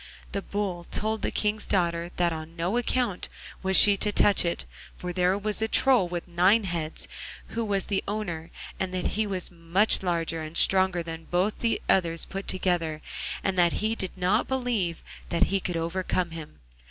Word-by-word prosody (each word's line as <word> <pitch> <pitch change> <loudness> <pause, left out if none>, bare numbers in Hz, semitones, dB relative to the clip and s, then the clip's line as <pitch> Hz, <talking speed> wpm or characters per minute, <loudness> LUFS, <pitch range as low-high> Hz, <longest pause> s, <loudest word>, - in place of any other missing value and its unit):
The 200 - -1
Bull 190 -4 -3
told 220 +4 -1
the - - 0
King's 210 0 0
daughter 170 -3 0
that 175 -1 +1
on 160 +1 -7
no 175 +5 -1
account 245 -5 0 0.3
was 190 0 +3
she 205 -1 +6
to 210 - +1
touch 205 -1 +4
it, 170 - -2 0.3
for 180 0 -5
there 180 +1 +2
was 210 +1 -2
a 220 - +2
Troll 250 -5 +4
with 175 0 -5
nine 185 +6 +4
heads 170 -4 -3 0.4
who 230 - -2
was 200 -3 -1
the 195 -2 -1
owner, 175 -6 -3 0.3
and 190 -1 -1
that 185 - 0
he 215 +1 -1
was 185 -3 -3
much 175 +5 +2
larger 165 -3 -1
and 155 +1 -3
stronger 185 -2 +5
than 165 -1 -7
both 185 +5 0
the 230 -2 +1
others 170 -3 +2
put 195 0 -6
together, 170 -4 0 0.4
and 190 -2 0
that 175 -1 +4
he 220 +1 0
did 190 -4 -4
not 185 +5 +2
believe 240 -10 -1 0.3
that 170 - +2
he 195 - +3
could 180 -2 -3
overcome 175 +1 -1
him. 160 -2 -9
185 Hz, 185 wpm, -27 LUFS, 170-205 Hz, 0.4 s, she